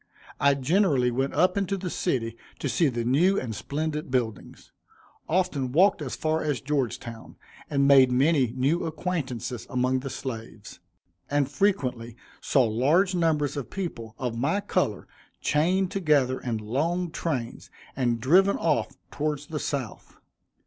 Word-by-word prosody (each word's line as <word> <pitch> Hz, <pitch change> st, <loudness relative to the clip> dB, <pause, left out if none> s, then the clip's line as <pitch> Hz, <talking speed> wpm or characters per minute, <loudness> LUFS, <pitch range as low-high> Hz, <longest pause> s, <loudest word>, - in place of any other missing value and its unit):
I 140 Hz, 0 st, +4 dB
generally 140 Hz, -3 st, +2 dB
went 135 Hz, +3 st, -1 dB
up 180 Hz, 0 st, +3 dB
into 195 Hz, 0 st, -1 dB
the 180 Hz, -2 st, -4 dB
city 115 Hz, -9 st, -1 dB, 0.2 s
to -, -, -3 dB
see 165 Hz, -, +2 dB
the 120 Hz, -3 st, -2 dB
new 175 Hz, +11 st, +3 dB
and 115 Hz, -3 st, -4 dB
splendid 150 Hz, +5 st, -3 dB
buildings; 120 Hz, -5 st, -3 dB, 0.6 s
often 160 Hz, -7 st, 0 dB
walked 180 Hz, +4 st, +4 dB
as 135 Hz, -4 st, -4 dB
far 155 Hz, 0 st, 0 dB
as 145 Hz, -5 st, -1 dB
Georgetown, 130 Hz, -4 st, -3 dB, 0.3 s
and 140 Hz, -2 st, +2 dB
made 135 Hz, -2 st, +7 dB
many 135 Hz, -1 st, +3 dB
new 145 Hz, +8 st, +1 dB
acquaintances 145 Hz, -8 st, -4 dB
among 130 Hz, 0 st, +1 dB
the 135 Hz, +1 st, -6 dB
slaves, 115 Hz, -4 st, -7 dB, 0.5 s
and 145 Hz, -1 st, +1 dB
frequently 130 Hz, -, 0 dB, 0.3 s
saw 135 Hz, -, +3 dB
large 145 Hz, -, +2 dB
numbers 160 Hz, -5 st, +1 dB
of 140 Hz, -3 st, -5 dB
people 115 Hz, -, -5 dB
of 125 Hz, -3 st, -3 dB
my 140 Hz, +12 st, 0 dB
color 175 Hz, -, -1 dB, 0.3 s
chained 180 Hz, +5 st, +1 dB
together 145 Hz, -8 st, +2 dB
in 120 Hz, -3 st, -2 dB
long 160 Hz, +11 st, -1 dB
trains, 135 Hz, -9 st, -4 dB, 0.3 s
and 120 Hz, -3 st, 0 dB
driven 185 Hz, -, +4 dB
off 165 Hz, -, +1 dB, 0.2 s
towards 150 Hz, -1 st, -2 dB
the 150 Hz, 0 st, -4 dB
South. 135 Hz, -6 st, -5 dB
140 Hz, 140 wpm, -26 LUFS, 125-165 Hz, 0.6 s, made